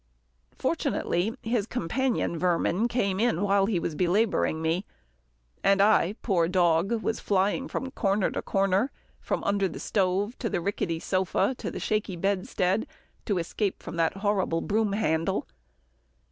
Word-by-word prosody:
Fortunately, 195 Hz, +7 st, 0 dB
his 225 Hz, -2 st, 0 dB
companion 245 Hz, -1 st, -1 dB
vermin 180 Hz, +5 st, +1 dB
came 200 Hz, -6 st, 0 dB
in 220 Hz, -5 st, +1 dB
while 200 Hz, -1 st, +3 dB
he 205 Hz, -4 st, +1 dB
was 165 Hz, -, -3 dB
belabouring 180 Hz, 0 st, +1 dB
me, 165 Hz, +4 st, 0 dB, 0.8 s
and 195 Hz, 0 st, +4 dB
I, 205 Hz, -1 st, +4 dB
poor 175 Hz, -7 st, +2 dB
dog, 180 Hz, +4 st, +2 dB
was 225 Hz, -, -1 dB
flying 205 Hz, +7 st, +1 dB
from 265 Hz, -, -4 dB
corner 200 Hz, -6 st, +1 dB
to -, -, -3 dB
corner, 195 Hz, +5 st, +1 dB, 0.3 s
from -, -, -2 dB
under 200 Hz, -1 st, +1 dB
the 170 Hz, -, -7 dB
stove, 200 Hz, +3 st, 0 dB
to 230 Hz, -, -1 dB
the -, -, -1 dB
rickety 170 Hz, -3 st, -2 dB
sofa, 190 Hz, +6 st, 0 dB
and -, -, -2 dB
the -, -, -3 dB
shaky 210 Hz, -3 st, -1 dB
bedstead, 190 Hz, +2 st, 0 dB, 0.4 s
to 200 Hz, -, 0 dB
escape 185 Hz, +4 st, -1 dB
the 165 Hz, -1 st, 0 dB
terrible 195 Hz, -5 st, +1 dB
broom 210 Hz, -1 st, 0 dB
handle. 190 Hz, -2 st, 0 dB
195 Hz, 145 wpm, -27 LUFS, 175-215 Hz, 0.8 s, and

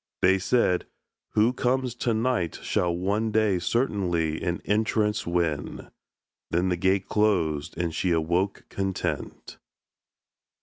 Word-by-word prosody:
They 95 Hz, +1 st, +5 dB
said, 90 Hz, -3 st, +1 dB, 0.5 s
"Who 110 Hz, +3 st, +3 dB
comes 130 Hz, 0 st, 0 dB
to 120 Hz, -1 st, -1 dB
night 110 Hz, -8 st, 0 dB
Shall 90 Hz, -, +1 dB
one 100 Hz, +5 st, 0 dB
day 105 Hz, -4 st, +2 dB
certainly 85 Hz, -, 0 dB
an 85 Hz, -1 st, -1 dB
entrance 105 Hz, -1 st, +1 dB
win;" 85 Hz, -4 st, -2 dB, 0.6 s
Then 90 Hz, +2 st, +1 dB
the 90 Hz, -, +1 dB
gate 95 Hz, +2 st, +1 dB
closed 85 Hz, -10 st, +1 dB
and 85 Hz, -1 st, -1 dB
she 90 Hz, -, 0 dB
awoke 85 Hz, +4 st, 0 dB
content. 95 Hz, -1 st, -4 dB
95 Hz, 120 wpm, -26 LUFS, 85-110 Hz, 0.6 s, They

